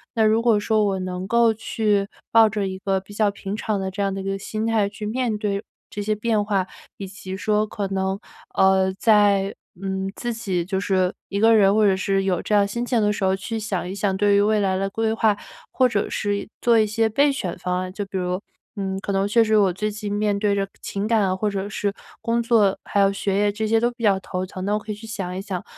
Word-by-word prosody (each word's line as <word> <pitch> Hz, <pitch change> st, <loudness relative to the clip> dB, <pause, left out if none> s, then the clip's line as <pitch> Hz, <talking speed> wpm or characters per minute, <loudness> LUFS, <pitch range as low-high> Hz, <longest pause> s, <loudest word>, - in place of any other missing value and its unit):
那 225 Hz, -, +3 dB
如 220 Hz, +1 st, +4 dB
果 230 Hz, -2 st, +4 dB
说 215 Hz, 0 st, +2 dB
我 195 Hz, -2 st, 0 dB
能 185 Hz, 0 st, -4 dB
够 235 Hz, +1 st, +4 dB
去 210 Hz, -2 st, 0 dB, 0.2 s
抱 225 Hz, -1 st, +7 dB
着 205 Hz, -2 st, -2 dB
一 190 Hz, 0 st, -5 dB
个 190 Hz, 0 st, 0 dB
比 195 Hz, +2 st, -14 dB
较 210 Hz, 0 st, +2 dB
平 200 Hz, 0 st, -6 dB
常 215 Hz, -1 st, -2 dB
的 190 Hz, 0 st, -3 dB
这 200 Hz, +2 st, -4 dB
样 195 Hz, -1 st, 0 dB
的 195 Hz, -, -4 dB
一 -, -, -7 dB
个 195 Hz, 0 st, -2 dB
心 215 Hz, +2 st, -3 dB
态 225 Hz, -3 st, +2 dB
去 205 Hz, +1 st, -7 dB
面 230 Hz, 0 st, -1 dB
对 205 Hz, -1 st, -2 dB, 0.3 s
这 205 Hz, -, -5 dB
些 215 Hz, +1 st, 0 dB
变 215 Hz, 0 st, 0 dB
化， 195 Hz, -3 st, 0 dB, 0.3 s
以 195 Hz, -, -6 dB
及 190 Hz, -1 st, -7 dB
说 210 Hz, +1 st, +1 dB
可 205 Hz, -1 st, -3 dB
能， 190 Hz, 0 st, -1 dB, 0.4 s
呃， 190 Hz, 0 st, +4 dB
在 200 Hz, -2 st, +3 dB, 0.3 s
嗯， 190 Hz, 0 st, -2 dB
自 240 Hz, -, -3 dB
己 190 Hz, -6 st, -2 dB
就 190 Hz, +1 st, -1 dB
是 185 Hz, -2 st, +1 dB, 0.2 s
一 200 Hz, -, -2 dB
个 225 Hz, +1 st, +6 dB
人， 200 Hz, -2 st, +5 dB
或 215 Hz, -, +4 dB
者 195 Hz, -2 st, +4 dB
是 195 Hz, 0 st, 0 dB
有 185 Hz, -2 st, +1 dB
这 -, -, -2 dB
样 200 Hz, -1 st, +4 dB
心 235 Hz, +4 st, -3 dB
情 240 Hz, -2 st, +1 dB
的 210 Hz, 0 st, +2 dB
时 210 Hz, -, -4 dB
候 190 Hz, 0 st, +3 dB
去 225 Hz, +4 st, -4 dB
想 200 Hz, -5 st, -3 dB
一 -, -, -4 dB
想， 200 Hz, -1 st, 0 dB
对 205 Hz, 0 st, +3 dB
于 200 Hz, -, +5 dB
未 215 Hz, +1 st, +2 dB
来 190 Hz, -2 st, +1 dB
的 195 Hz, +1 st, -1 dB
规 225 Hz, +2 st, -1 dB
划， 220 Hz, -2 st, +2 dB, 0.4 s
或 255 Hz, -, +3 dB
者 205 Hz, -4 st, 0 dB
是 205 Hz, -1 st, -2 dB
做 235 Hz, -1 st, +4 dB
一 215 Hz, -, +4 dB
些 220 Hz, +1 st, +1 dB
备 280 Hz, +6 st, +3 dB
选 190 Hz, -11 st, -4 dB
方 180 Hz, 0 st, -1 dB
案。 185 Hz, 0 st, -4 dB
就 205 Hz, +1 st, -4 dB
比 195 Hz, -, -11 dB
如， 180 Hz, 0 st, -1 dB, 0.4 s
嗯， 195 Hz, -2 st, -3 dB
可 200 Hz, -, -3 dB
能 195 Hz, 0 st, +1 dB
确 230 Hz, +3 st, +4 dB
实 215 Hz, -1 st, +3 dB
我 195 Hz, -3 st, +3 dB
最 210 Hz, +4 st, -2 dB
近 210 Hz, 0 st, -5 dB
面 205 Hz, -1 st, +1 dB
对 205 Hz, 0 st, +1 dB
着 195 Hz, 0 st, -1 dB, 0.2 s
情 200 Hz, +1 st, -3 dB
感 210 Hz, -5 st, +2 dB
或 210 Hz, +2 st, 0 dB
者 200 Hz, -1 st, -3 dB
是 205 Hz, -1 st, -1 dB, 0.3 s
工 230 Hz, +1 st, 0 dB
作， 220 Hz, -4 st, +3 dB
还 205 Hz, -, -1 dB
有 195 Hz, 0 st, +4 dB
学 195 Hz, 0 st, -1 dB
业 205 Hz, 0 st, +2 dB
这 215 Hz, +1 st, -2 dB
些 225 Hz, +1 st, +3 dB
都 240 Hz, +1 st, +2 dB
比 240 Hz, -1 st, -11 dB
较 200 Hz, -3 st, +4 dB
头 185 Hz, 0 st, -4 dB
疼， 185 Hz, 0 st, -7 dB
那 205 Hz, -, 0 dB
我 -, -, +2 dB
可 215 Hz, -, -7 dB
以 -, -, -3 dB
去 215 Hz, +2 st, -11 dB
想 195 Hz, -4 st, -4 dB
一 -, -, -3 dB
想， 195 Hz, -3 st, -5 dB
205 Hz, 275 characters per minute, -23 LUFS, 195-215 Hz, 0.4 s, 抱